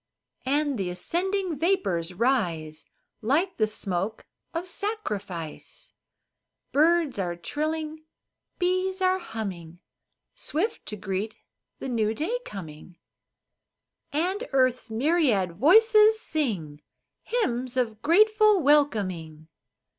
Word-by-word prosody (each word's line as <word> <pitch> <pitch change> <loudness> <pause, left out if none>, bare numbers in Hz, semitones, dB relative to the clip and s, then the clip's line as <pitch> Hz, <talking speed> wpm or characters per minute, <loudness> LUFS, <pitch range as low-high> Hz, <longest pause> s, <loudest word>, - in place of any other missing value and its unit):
And 285 -2 +1
the 185 -2 -1
ascending 350 - -2
vapors 300 - +1
rise 170 -10 0 0.3
Like 310 - +1
the 215 - +3
smoke 195 0 -3 0.3
of 345 +2 -4
sacrifice. 205 - -5 0.8
Birds 315 -4 +3
are 175 -2 -1
trilling, 310 - -4 0.5
bees 370 +1 0
are 375 0 +2
humming, 195 - -6 0.6
Swift 360 +10 -3
to 210 - -4
greet 195 +1 -3 0.4
the - - -6
new 225 -3 0
day 405 - -1
coming, 175 - -9 1.1
And 370 +10 -1
earth's 255 -3 +2
myriad 225 - +1
voices 435 - +6
sing 195 - -2 0.4
Hymns 255 - -1
of 225 -4 -1
grateful 425 +4 +5
welcoming. 195 - +1
265 Hz, 95 wpm, -26 LUFS, -, 1.1 s, voices